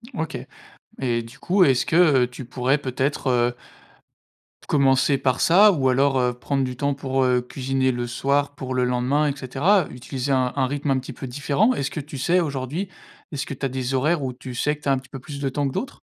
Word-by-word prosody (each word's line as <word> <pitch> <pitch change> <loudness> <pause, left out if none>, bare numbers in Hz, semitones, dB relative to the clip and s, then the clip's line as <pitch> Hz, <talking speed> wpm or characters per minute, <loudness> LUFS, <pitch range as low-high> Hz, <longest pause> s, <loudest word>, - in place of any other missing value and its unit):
OK 160 - -3 0.7
et 120 -2 0
du 115 +5 -14
coup, 185 0 +3
est-ce 130 -3 +2
que, 165 - +1
heu, 145 -8 +5
tu 125 +1 -8
pourrais 130 +3 0
peut-être, 135 +1 -2
heu 120 -1 +2 1.1
commencer 135 0 +3
par 130 -2 0
ça 200 +5 +6
ou 135 -7 +1
alors, 135 +1 +2
heu, 125 -1 +1
prendre 135 +2 -2
du 125 -1 -4
temps 140 0 0
pour, 135 -1 -1
heu, 125 -1 +2
cuisiner 130 +1 -1
le 120 0 -3
soir 140 +4 0
pour 130 -1 -5
le 125 -1 +1
lendemain 125 +5 +1
et 140 - -3
cetera? 145 +8 +2
Utiliser 130 +2 -4
un 130 -2 +1
un 130 -2 +1
rythme 145 +1 -2
un 130 - +2
petit 130 - -8
peu 135 - -7
différent? 145 - +1
Est-ce 135 0 -2
que 155 - -4
tu 145 -1 -8
sais, 175 +7 +2
aujourd'hui, 150 +4 -3 0.4
est-ce 140 -2 -3
que - - -6
tu 135 - -4
as - - 0
des 130 0 -3
horaires 150 +3 +1
où 130 -1 -3
tu 125 0 -9
sais 150 +5 0
que 150 - -21
tu - - -1
as - - +5
un 135 - +3
petit 135 - -18
peu 135 - -8
plus 140 +2 -8
de 135 - 0
temps 140 +1 -1
que 135 - -5
d'autres? 270 +3 -5
135 Hz, 235 wpm, -23 LUFS, 130-145 Hz, 1.1 s, ça